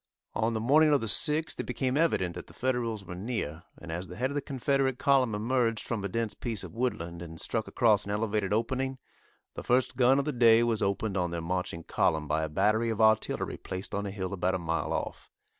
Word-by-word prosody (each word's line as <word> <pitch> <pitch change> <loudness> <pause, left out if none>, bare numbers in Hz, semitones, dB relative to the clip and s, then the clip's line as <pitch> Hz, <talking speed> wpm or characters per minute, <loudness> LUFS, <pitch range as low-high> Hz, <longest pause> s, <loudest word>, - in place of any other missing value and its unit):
On 115 +1 0
the - - 0
morning 150 +7 +4
of 145 - +4
the - - -2
6th 150 +8 +2
it - - -2
became 130 -1 -1
evident 145 - +1
that 90 - -8
the - - -16
Federals 120 -5 -1
were 90 - -7
near, 90 -6 -4 0.2
and 85 - -8
as 90 +3 -4
the 90 - -9
head 130 +6 -1
of - - -4
the 145 - -1
Confederate 135 -1 0
column 130 -6 +3
emerged 115 0 0
from 115 -4 -3
a - - -1
dense 115 +2 -2
piece 115 -5 -3
of - - -9
woodland, 85 -9 -3
and 80 -1 -8
struck 110 -2 -2
across 110 -4 +3
an - - -7
elevated 105 -1 -1
opening, 130 +5 -1 0.6
the - - -6
first 125 +1 +1
gun 130 +1 +5
of 140 - 0
the 150 - 0
day 115 -1 +6
was 115 -2 0
opened 100 0 -1
on 90 -1 0
their 85 0 -3
marching 85 0 -3
column 80 -1 0
by 80 +2 0
a 80 - -2
battery 105 +8 +2
of 110 -1 -2
artillery 110 0 +2
placed 95 +1 -6
on 100 0 -2
a - - -3
hill 95 -1 -4
about 95 0 0
a - - +1
mile 85 -4 -2
off. - - -4
110 Hz, 230 wpm, -29 LUFS, 95-125 Hz, 0.6 s, day